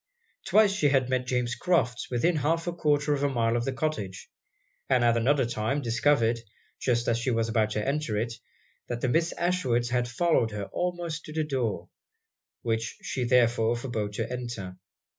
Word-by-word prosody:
Twice 215 -2 +5
she 195 -7 +2
had 130 -2 +2
met 125 -1 0
James 125 -2 0
Crofts 125 -7 0
within 155 +8 +1
half 165 +3 0
a 175 - -2
quarter 150 -3 +1
of 140 - -1
a 145 - +2
mile 115 -3 +1
of 120 0 0
the 135 - 0
cottage; 130 -10 -4 0.6
and 125 -2 +3
at 120 -1 +4
another 130 +3 +2
time 120 +4 -1
discovered, 115 -1 +2 0.4
just 120 -2 0
as 115 0 +2
she 120 - -1
was 115 -2 +1
about 110 -1 +1
to 105 +2 -2
enter 140 -6 -1
it, 115 +2 -1 0.5
that 120 -1 -4
the - - +1
Miss 165 +6 +2
Ashwoods 130 -10 0
had 125 -1 +1
followed 120 -1 +2
her 105 -1 -4
almost 175 -3 -3
to 155 - -8
the 160 0 0
door; 130 -8 -2 0.7
which 115 -1 -2
she 125 -2 -2
therefore 120 -2 +3
forbore 120 -4 -3
to - - -2
enter. 120 -7 -6
125 Hz, 180 wpm, -27 LUFS, 115-145 Hz, 0.7 s, Twice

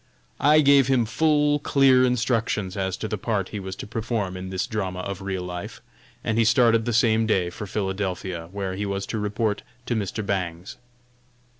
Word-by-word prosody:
I 150 +2 +5
gave 140 -2 +5
him 130 -4 +3
full, 150 +4 +2
clear 135 -3 +4
instructions 115 -6 0
as 95 -2 -2
to 110 - -4
the 105 -1 -3
part 100 -3 -1
he 105 - -5
was 95 -1 -6
to - - -7
perform 110 -3 -3
in 95 0 -6
this 95 -1 -2
drama 95 -6 -3
of 100 0 -5
real 95 -2 -3
life, 90 -1 -6 0.4
and 110 +1 0
he - - +5
started 115 0 +4
the 120 - 0
same 110 -1 +3
day 90 -5 +1
for 105 +4 -7
Philadelphia, 95 -3 -3
where 100 -2 -3
he 100 +2 -3
was 100 0 -2
to 110 - -3
report 105 +1 -1 0.2
to - - -1
Mr. 105 0 -3
Bangs. 90 -2 -3
105 Hz, 185 wpm, -24 LUFS, 95-115 Hz, 0.4 s, I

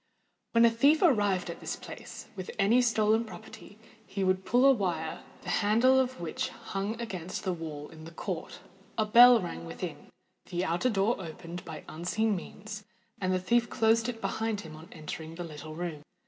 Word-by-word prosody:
When 230 0 +6
a 230 - +6
thief 280 +9 +4
arrived 205 - +3
at - - -9
this - - -4
place - - -9
with 185 -2 -6
any 220 +5 +4
stolen 220 -1 +3
property, 220 -1 -11 0.3
he 195 -2 -3
pulled 240 +7 +2
a 275 - +9
wire 175 -9 -1 0.2
the - - -3
handle 230 +6 +5
of 260 -3 -1
which 170 -2 -3
hung 200 +4 -4
against 185 -7 -5
the 190 -3 0
wall 155 -3 -6
in 160 -1 -12
the - - -8
court: - - -5 0.4
a 220 - +2
bell 240 +2 +8
rang 170 - -5
within—the 175 - -7
outer 175 +9 +1
door 215 +1 +2
opened 170 0 -7
by 160 -2 -7
unseen 205 +7 0
means, 210 +3 -7 0.4
and 185 -1 0
the 185 - +2
thief 235 +5 +2
closed 225 0 +3
it 225 -2 -6
behind 220 -3 -1
him 155 -3 -10
on 160 +2 -12
entering 160 0 -7
the 175 - -5
little 155 -1 -8
room. 165 -3 -4
200 Hz, 175 wpm, -30 LUFS, 170-230 Hz, 0.4 s, a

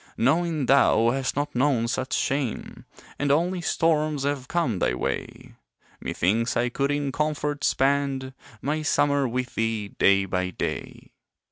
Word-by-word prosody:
Knowing 160 +3 +1
thou 120 -3 +4
hast 135 0 -2
not 145 +1 -2
known 125 -2 +2
such 130 +2 -3
shame, 135 -3 -2 0.3
And 145 0 +1
only 175 +5 +1
storms 155 -3 +1
have 140 -2 -2
come 135 - 0
thy 60 - +1
way, - - -4 0.5
Methinks 115 +7 0
I 120 +1 +1
could 140 +3 -1
in 145 -1 -1
comfort 150 0 -2
spend 135 -1 +1 0.3
My 150 +3 -1
summer 145 -2 +2
with 125 +1 -3
thee, 110 -2 -1
day 100 0 +3
by 90 -1 -1
day. - - -5
135 Hz, 140 wpm, -25 LUFS, 120-145 Hz, 0.5 s, thou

